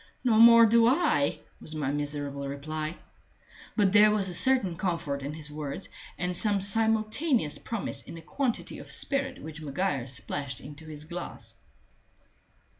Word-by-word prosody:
"No 230 -4 +3
more 230 0 +9
do 230 +1 +5
I," 240 - +2 0.2
was 155 - -7
my 145 -3 -1
miserable 145 -1 -3
reply. 155 +3 -4 0.8
But 205 -4 +3
there 210 0 +7
was 205 -3 +1
a - - -3
certain 205 -3 +3
comfort 170 -6 -2
in 140 +2 -5
his 150 -1 -7
words, 150 +4 -5 0.3
and 180 0 -2
some 205 +1 +2
simultaneous 220 - +1
promise 230 -4 -3
in - - -10
the 165 - -9
quantity 250 - -2
of - - -11
spirit 270 -2 -1
which 160 0 -8
Maguire 145 -3 -2
splashed 135 +1 -4
into 145 +3 -11
his 150 -1 -8
glass. 175 +2 -7
170 Hz, 150 wpm, -28 LUFS, 145-220 Hz, 0.8 s, more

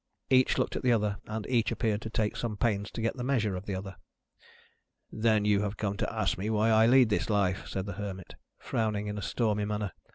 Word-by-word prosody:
Each 130 -1 +4
looked - - 0
at - - -2
the 125 - +3
other, 105 -3 +1
and 110 -1 -4
each 120 -3 +1
appeared 110 -3 0
to 110 - -5
take 110 -1 -1
some 110 -3 -3
pains 105 -2 0
to 115 - -5
get 115 +4 -1
the 125 - -4
measure 115 -7 +1
of 90 +2 -7
the 100 - -2
other. 95 0 -7 1.1
"Then 110 -1 +2
you 105 -1 +3
have 105 0 -3
come 100 -2 -2
to - - -2
ask - - -1
me 105 +3 -2
why 110 +1 +2
I 110 +1 +5
lead 125 -1 +6
this 105 - 0
life," 100 -3 +1
said 95 -1 -3
the 100 - -5
Hermit, 95 -3 -6 0.2
frowning 105 -2 -1
in 105 0 -4
a - - -6
stormy 105 -1 0
manner. 105 -2 -2
105 Hz, 230 wpm, -29 LUFS, 100-115 Hz, 1.1 s, lead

